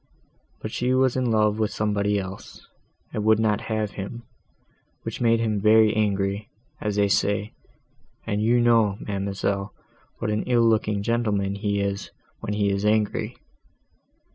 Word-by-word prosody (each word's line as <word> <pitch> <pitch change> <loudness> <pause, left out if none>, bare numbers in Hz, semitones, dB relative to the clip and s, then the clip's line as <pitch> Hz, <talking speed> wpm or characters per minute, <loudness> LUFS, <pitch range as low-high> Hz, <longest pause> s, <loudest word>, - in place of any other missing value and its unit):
But 110 - -4
she 125 +3 0
was 130 -1 +3
in 130 -2 0
love 105 -1 +2
with 110 -1 +1
somebody 105 -1 0
else, 95 0 -7 0.5
and 105 - -2
would 110 0 +5
not 105 -2 +1
have 110 -2 -1
him, 110 +4 -7 0.8
which - - -5
made 115 -1 +3
him 110 -3 0
very 110 0 +5
angry, 100 -1 0 0.3
as 105 -2 -1
they 100 0 +3
say, 100 +1 0 0.7
and 105 0 -1
you 120 +3 +3
know, 115 -4 +3
ma'amselle, 100 0 -2 0.4
what 105 - -2
an 105 - 0
ill 120 -2 +4
looking 105 -2 +1
gentleman 105 -4 0
he 100 0 -1
is, 100 0 -3 0.3
when 105 - -4
he 100 -1 +1
is 100 0 -1
angry. 105 0 +1
105 Hz, 150 wpm, -24 LUFS, 100-110 Hz, 0.8 s, would